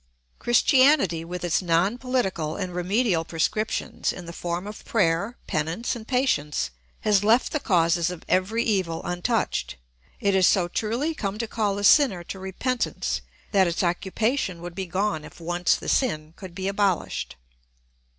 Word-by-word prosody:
Christianity, 255 - +4
with 175 +1 -6
its 175 0 +1
non 180 +6 +1
political 195 -12 -1
and 185 -3 -4
remedial 180 0 +1
prescriptions, 170 +7 -1
in 180 - -8
the 170 - -8
form 175 +2 -3
of 210 0 -8
prayer, 200 +2 +1
penance, 160 +12 -2
and 225 -2 -9
patience, 150 - 0 0.3
has 205 -2 +3
left 225 +4 +3
the 300 - 0
causes 170 - +2
of 180 -2 -7
every 210 +6 +1
evil 185 -8 0
untouched. 175 - -1 0.4
It 200 -1 +1
has 190 -1 +5
so 180 -3 +3
truly 235 - -1
come 200 -7 -3
to 230 +1 -3
call 210 -3 -1
the 200 - -4
sinner 205 - +5
to 190 - -7
repentance 190 - -2 0.3
that 190 -2 +4
its 170 +2 -1
occupation 190 +3 -1
would 175 0 -6
be 190 +1 -4
gone 185 -3 -1
if - - -12
once 175 +1 +1
the - - -8
sin 155 - 0
could 185 -3 -10
be 190 0 -3
abolished. 200 -3 -1
190 Hz, 160 wpm, -25 LUFS, 170-220 Hz, 0.4 s, has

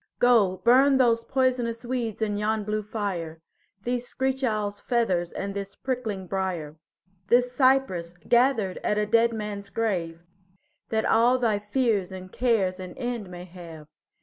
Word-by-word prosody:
Go 220 -7 +4
burn 265 +3 +6
those 230 -3 +3
poisonous 250 -3 0
weeds 235 -3 -2
in 210 -1 -1
yon 215 +1 0
blue 215 +1 -1
fire, 195 -7 -4 0.4
These 245 +1 -2
screech 265 +1 -2
owl's 210 -4 -1
feathers 190 -8 0
and 200 0 -4
this 200 0 -6
prickling 230 -7 -3
briar, 175 -5 -3 0.5
This 245 +2 +3
cypress 255 -10 +2
gathered 235 -6 +2
at 210 - -1
a 210 - +2
dead 230 +2 +3
man's 210 -2 -5
grave, 180 -7 -2 0.7
That 220 -1 0
all 240 +3 +4
thy 225 -5 +1
fears 210 -3 0
and 185 0 -9
cares 200 -7 +1
an 185 -1 -8
end 240 -6 -4
may 180 0 -8
have. 165 -4 -11
215 Hz, 150 wpm, -26 LUFS, 190-245 Hz, 0.7 s, burn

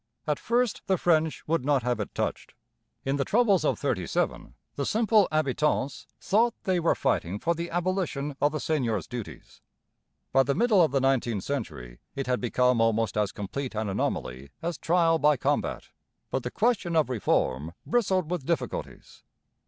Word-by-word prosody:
At 150 -2 0
first 240 -1 0
the 190 - +2
French 160 -2 +1
would 165 -3 +1
not 140 -2 +2
have 125 -2 0
it 105 - -5
touched. - - -3 0.5
In 135 +1 0
the 140 - +1
troubles 210 - +3
of - - +1
'37 - - -2 0.2
the - - -2
simple 220 -2 +3
habitants 150 -2 0
thought 230 +4 +2
they 185 -3 +1
were 170 - +2
fighting 90 +4 0
for 170 +10 0
the 170 +1 -5
abolition 175 -5 -2
of 145 - +3
the 155 - -3
seigneurs' 120 - -1
dues. 120 -4 -9 0.7
By 135 - +6
the 135 +1 0
middle 225 -4 +4
of 160 - +3
the 135 0 +1
nineteenth 120 -6 +1
century 80 - -5 0.2
it 135 - -2
had 125 0 0
become 125 0 +2
almost 115 0 +1
as 105 -2 +1
complete 120 +5 -5
an 110 -1 -1
anomaly 70 -7 -3
as 170 -1 -4
trial 165 -1 +3
by 150 -1 +4
combat. - - -1 0.4
But 130 - 0
the 125 - -4
question 210 - 0
of 160 -2 +3
reform 80 - 0
bristled 190 -8 +1
with 175 -6 -2
difficulties. 170 - -4
145 Hz, 170 wpm, -27 LUFS, 120-175 Hz, 0.7 s, By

